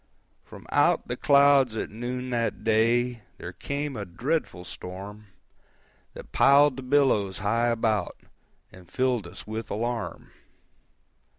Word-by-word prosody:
From - - -13
out - - +2
the 120 - -3
clouds 140 -4 +4
at - - -4
noon 125 +3 -5
that 115 -3 -2
day 115 +2 +2 0.2
There - - -8
came 140 0 -4
a 105 - -4
dreadful 100 - -3
storm, 100 +4 -9 0.9
That - - -11
piled 140 -1 +5
the - - -5
billows 125 -8 +2
high 115 +4 +1
about, 110 -4 0 0.5
And 90 -2 -16
filled 125 -7 0
us 85 - -11
with 110 +1 -6
alarm. 115 +2 -4
120 Hz, 125 wpm, -26 LUFS, 105-130 Hz, 0.9 s, piled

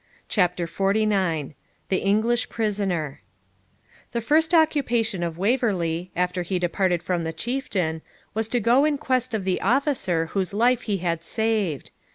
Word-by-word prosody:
CHAPTER 180 -3 +1
XLIX 195 -5 0 0.4
THE 190 - +2
ENGLISH 220 +4 +2
PRISONER 195 -9 -2 0.9
The 235 - -1
first 315 +7 +3
occupation 270 - +2
of 170 -1 -3
Waverley, 185 -6 0
after 180 +1 0
he 180 +2 -2
departed 175 0 0
from 175 0 -1
the 160 - -2
Chieftain, 180 -5 -2 0.3
was 220 0 -1
to 245 +2 +1
go 240 +5 +4
in 300 -1 +2
quest 255 -3 0
of 210 - -2
the 185 -1 0
officer 235 - +1
whose 195 0 -1
life 245 +3 +3
he 200 - +1
had 170 -2 -2
saved. 210 -6 -1
195 Hz, 145 wpm, -24 LUFS, 175-235 Hz, 0.9 s, go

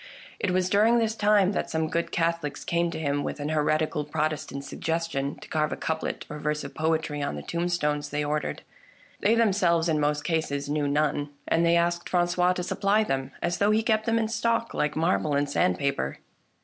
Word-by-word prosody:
It 205 - 0
was 180 0 +1
during 215 +5 +4
this 225 -2 +1
time 205 -3 +4
that 200 - -2
some 160 0 0
good 170 +2 -2
Catholics 165 -3 -1
came 170 0 +1
to - - -5
him 145 -2 -1
with - - -4
an 145 +1 -3
heretical 155 0 +1
Protestant 150 -2 -2
suggestion 155 -1 -2
to - - -13
carve 155 -1 0
a - - -1
couplet 160 0 -3
or 150 - -7
verse 150 0 -1
of - - -7
poetry 155 -2 -1
on 140 - -2
the 75 - -6
tombstones 170 -4 -1
they 150 +1 -1
ordered. 150 +1 -2 0.6
They 220 +3 +3
themselves, 185 -7 +3
in 155 -2 +1
most 150 0 0
cases, 155 -4 -1
knew 145 -1 0
none, 145 0 0 0.2
and 165 - +2
they 170 0 +4
asked 170 0 0
Francois 180 0 +2
to 180 - -3
supply 200 +4 +2
them 135 -8 -2
— - - -28
as 175 +1 -1
though 205 - +3
he 215 +1 +3
kept 220 -1 +1
them 230 0 +3
in 225 -1 +1
stock 230 +1 0
like 150 0 0
marble 160 -2 +1
and 145 0 +1
sandpaper. 140 - 0
160 Hz, 200 wpm, -26 LUFS, 150-180 Hz, 0.6 s, during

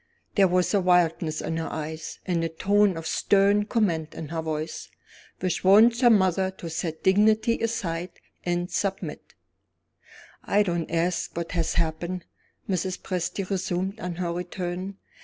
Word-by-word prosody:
There 195 -2 +5
was 180 +1 +1
a 200 - +3
wildness 170 -3 +2
in 160 - -3
her 165 - -3
eyes, 155 +1 -5
and 175 -3 0
a 165 - 0
tone 200 +3 +2
of 165 - -6
stern 200 +3 +3
command 170 -9 0
in 155 - -6
her 165 0 -2
voice, 155 0 -4 0.5
which 185 -2 -1
warned 215 +5 +7
her 245 - +7
mother 190 -3 +3
to 175 -3 -8
set 160 0 -4
dignity 215 +4 +3
aside, 180 -7 -2 0.3
and 175 0 -1
submit. 195 -1 -3 1.1
"I 205 +1 +3
don't 170 -4 -2
ask 170 +1 -1
what 170 -1 -3
has 165 -2 -1
happened," 170 +2 -2 0.4
Mrs. 185 -1 -1
Presty 185 +1 -3
resumed 190 +1 -2
on 180 -1 -4
her 170 -1 -2
return. 180 +2 -4
180 Hz, 150 wpm, -26 LUFS, 165-195 Hz, 1.1 s, warned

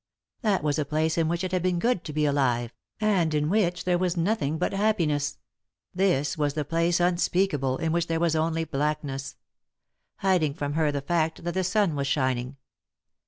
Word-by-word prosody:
That 205 - +1
was 150 0 0
a - - +2
place 155 +2 0
in 165 -2 +1
which 170 +2 -1
it 185 - -2
had 185 -1 0
been 180 0 +1
good 230 -1 +1
to 155 - -5
be 150 0 0
alive, 125 -4 +1 0.3
and 195 -7 +2
in 150 0 +1
which 180 -4 +1
there 180 -1 +1
was 180 -1 0
nothing 165 -4 0
but 180 - -1
happiness; 170 -9 0 0.6
this 175 -7 +1
was 145 -1 0
the 150 -2 -1
place 165 +3 +1
unspeakable, 175 -6 +1
in 165 -1 -1
which 170 0 0
there 165 0 0
was 165 -1 +1
only 165 +1 0
blackness; 145 -2 -3 0.8
hiding 175 -7 +1
from 145 -2 -3
her 155 -1 +2
the 140 -1 -2
fact 160 +2 -1
that 175 0 -2
the 190 - 0
sua 205 +3 +2
was 140 -3 -2
shining. 130 -1 -1
160 Hz, 190 wpm, -26 LUFS, 145-180 Hz, 0.8 s, a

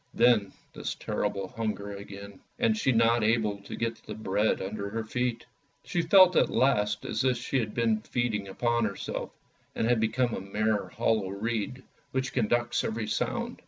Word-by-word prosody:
Then 115 -5 +4 0.2
this - - -4
terrible 100 -1 -2
hunger 105 -2 -3
again, 100 0 -9 0.2
and 230 -2 +2
she 215 -11 +2
not 115 -1 +3
able 105 -2 +1
to 100 - -8
get 115 0 -2
at - - -28
the - - -7
bread 105 0 +1
under 100 +1 -4
her 115 +2 -3
feet. 125 +1 -2 0.4
She 175 - -1
felt 185 +1 +7
at - - +4
last 105 -6 +2
as - - -1
if 130 -2 +2
she 130 +2 -1
had 110 -3 -3
been 115 -2 +2
feeding 110 -4 -1
upon 120 +4 0
herself, 100 -2 -4 0.5
and - - 0
had 120 0 +3
become 115 +2 +1
a - - -3
mere 105 +2 0
hollow 110 -4 0
reed 115 +6 -3 0.3
which 130 0 -1
conducts 120 0 +1
every 110 0 -2
sound. 105 - -2
110 Hz, 175 wpm, -28 LUFS, 105-120 Hz, 0.5 s, felt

